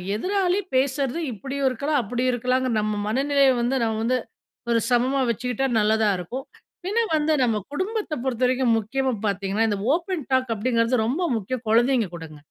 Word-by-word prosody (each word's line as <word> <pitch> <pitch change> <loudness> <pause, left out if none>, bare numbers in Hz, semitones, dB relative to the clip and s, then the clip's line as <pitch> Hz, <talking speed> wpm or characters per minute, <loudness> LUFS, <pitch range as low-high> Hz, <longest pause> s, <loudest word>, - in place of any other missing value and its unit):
எதிராளி 375 - +1 0.2
பேசற்து 270 +2 +1
இப்டியும் 270 +5 -2
இருக்கலாம், 280 +4 0
அப்டியும் 245 +4 -1
இருக்கலாம்ங்க, 255 +2 0
நம்ம 210 0 -1
மனநிலைய 275 +3 +3
வந்து 245 +3 0
நம்ம 220 -1 -1
வந்து 255 +2 +2 0.5
ஒரு 230 - +3
சமமா 250 +3 +2
வச்சுக்கிட்டா 250 +3 -1
நல்லதா 215 0 +3
இருக்கும். 245 +10 -6 0.4
பின்ன 420 +5 0 0.2
வந்து 310 +1 +2
நம்ம 225 -3 +1 0.2
குடும்பத்தைப் 375 - -3
பொறுத்த 255 -1 -1
வரைக்கும் 250 -2 +2
முக்கியமா 260 +4 -1
பார்த்தீங்கன்னா, 200 +3 0
இந்த 205 -2 -1 0.2
ஓப்பன் 345 -4 -3
டாக் 255 -3 +2
அப்டிங்கிறது 230 +1 +1
ரொம்ப 280 +10 -1 0.2
முக்கியம் 230 +3 -5
குழந்தைங்க 235 -2 +3
கூடங்க. 160 -2 -9
255 Hz, 155 wpm, -24 LUFS, 225-275 Hz, 0.5 s, மனநிலைய